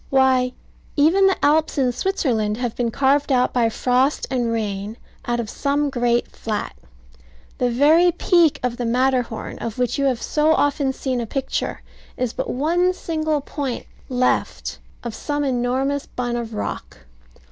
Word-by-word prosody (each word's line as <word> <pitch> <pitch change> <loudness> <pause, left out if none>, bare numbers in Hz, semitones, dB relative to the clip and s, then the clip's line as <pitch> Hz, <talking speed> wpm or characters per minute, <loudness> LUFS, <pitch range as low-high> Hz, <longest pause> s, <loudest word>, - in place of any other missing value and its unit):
Why, 260 -2 +3 0.4
even 335 +7 +5
the 385 - +2
Alps 310 +2 +2
in 260 -3 +2
Switzerland 240 - 0
have 245 -2 -3
been 240 -1 0
carved 275 +4 +2
out 250 -1 +2
by 235 -2 +3
frost 255 +5 +1
and 240 -3 0
rain, 210 -1 -3 0.3
out 240 0 0
of 235 - -2
some 285 +5 0
great 240 -2 +1
flat. 215 -2 -4 0.8
The 250 - +2
very 310 +8 +5
peak 345 -2 +3
of 245 -1 -1
the 245 - -2
Matterhorn, 250 -1 0
of 230 0 -5
which 250 +2 0
you 280 - +2
have 255 -4 +1
so 305 +4 +2
often 285 -2 +1
seen 260 -2 -2
a 230 - -4
picture, 270 +3 -3 0.3
is 250 -2 -1
but - - -3
one 345 +7 +1
single 310 -3 -1
point 275 -3 -4 0.2
left 255 0 0 0.2
of 235 -2 -4
some 290 +5 -2
enormous 265 +2 0
bun 245 -1 -3
of 230 -2 -4
rock. 210 - -6
255 Hz, 160 wpm, -22 LUFS, 240-290 Hz, 0.8 s, even